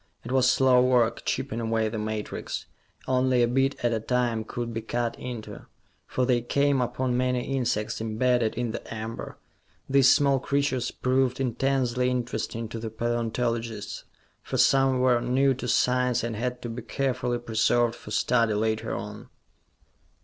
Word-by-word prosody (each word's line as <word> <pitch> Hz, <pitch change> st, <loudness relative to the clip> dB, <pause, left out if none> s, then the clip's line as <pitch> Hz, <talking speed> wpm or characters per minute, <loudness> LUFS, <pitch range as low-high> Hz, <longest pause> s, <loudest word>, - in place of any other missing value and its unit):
It 120 Hz, -, -7 dB
was 130 Hz, -1 st, +4 dB
slow 130 Hz, -1 st, +5 dB
work, 125 Hz, -2 st, +2 dB
chipping 130 Hz, -3 st, -2 dB
away 115 Hz, -1 st, 0 dB
the 110 Hz, 0 st, -4 dB
matrix. 110 Hz, 0 st, -4 dB, 0.4 s
Only 130 Hz, -1 st, +3 dB
a -, -, +3 dB
bit 135 Hz, +3 st, +1 dB
at 120 Hz, -, +2 dB
a 110 Hz, -, 0 dB
time 120 Hz, -1 st, 0 dB
could 120 Hz, +1 st, -5 dB
be 115 Hz, -, -3 dB
cut 120 Hz, +1 st, -2 dB
into, 120 Hz, -4 st, -7 dB, 0.4 s
for 130 Hz, -, 0 dB
they 125 Hz, -2 st, +2 dB
came 140 Hz, +2 st, +1 dB
upon 125 Hz, +1 st, -1 dB
many 125 Hz, +1 st, 0 dB
insects 110 Hz, -5 st, -1 dB
imbedded 115 Hz, +1 st, +1 dB
in 120 Hz, -1 st, -2 dB
the -, -, -7 dB
amber. 110 Hz, +1 st, -6 dB, 0.5 s
These 135 Hz, -1 st, +5 dB
small 140 Hz, -2 st, +4 dB
creatures 140 Hz, -2 st, 0 dB
proved 130 Hz, 0 st, 0 dB
intensely 125 Hz, 0 st, 0 dB
interesting 120 Hz, -2 st, -3 dB
to 115 Hz, -, -5 dB
the 110 Hz, 0 st, -4 dB
paleontologists, 115 Hz, -1 st, -2 dB, 0.4 s
for -, -, -4 dB
some 135 Hz, -1 st, +4 dB
were 125 Hz, -2 st, +3 dB
new 130 Hz, +3 st, +2 dB
to 125 Hz, -1 st, -6 dB
science 125 Hz, -1 st, +2 dB
and 115 Hz, -1 st, -3 dB
had 125 Hz, +3 st, -3 dB
to 120 Hz, -, -4 dB
be 115 Hz, +2 st, -5 dB
carefully 125 Hz, 0 st, -1 dB
preserved 115 Hz, 0 st, +1 dB
for 105 Hz, -, -12 dB
study 115 Hz, 0 st, +2 dB
later 110 Hz, +1 st, -1 dB
on. -, -, -7 dB
120 Hz, 155 wpm, -26 LUFS, 115-130 Hz, 0.5 s, slow